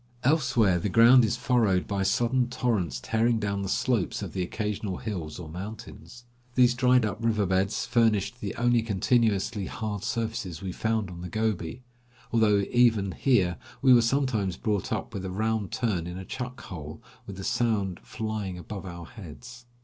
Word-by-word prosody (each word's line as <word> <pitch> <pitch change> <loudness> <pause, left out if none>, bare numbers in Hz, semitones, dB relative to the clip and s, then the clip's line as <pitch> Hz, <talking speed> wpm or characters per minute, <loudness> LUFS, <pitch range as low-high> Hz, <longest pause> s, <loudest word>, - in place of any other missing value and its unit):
Elsewhere 125 - +3
the 100 - -2
ground 120 +5 +7
is 115 +2 0
furrowed 115 -7 +2
by 100 -1 -1
sudden 120 +5 +1
torrents 105 - -1
tearing 115 - +1
down 100 -2 -2
the 95 - -3
slopes 120 -5 0
of - - -6
the 95 - -2
occasional 105 +1 -3
hills 85 -9 -5
or 90 -3 -8
mountains. 110 +7 -9 0.3
These 125 -1 +5
dried 125 -1 +3
up 105 +2 -4
river 110 -3 +2
beds 95 +2 0
furnished 110 -1 +1
the 100 - -4
only 120 0 +2
continuously 105 -2 +1
hard 105 -3 -4
surfaces 110 -8 -3
we 95 -1 -5
found 110 -1 -1
on 85 -1 -9
the 90 - -6
Gobi; 110 +1 -2 0.5
although 110 -3 +4
even 115 -5 +3
here 95 -7 +2 0.3
we 130 -2 +7
were 120 - +7
sometimes 115 -7 0
brought 105 -4 -1
up - - -3
with 95 - -4
a 95 - -4
round 110 +1 -1
turn 100 -9 -1
in 90 +1 -6
a 95 - -7
chuck 125 +3 -6
hole, 80 -6 -8 0.3
with 100 - -7
the 95 - -6
sand 100 -5 0
flying 110 -4 -4
above 95 +3 -7
our 85 -1 -8
heads. 120 - -11
110 Hz, 170 wpm, -27 LUFS, 95-120 Hz, 0.5 s, ground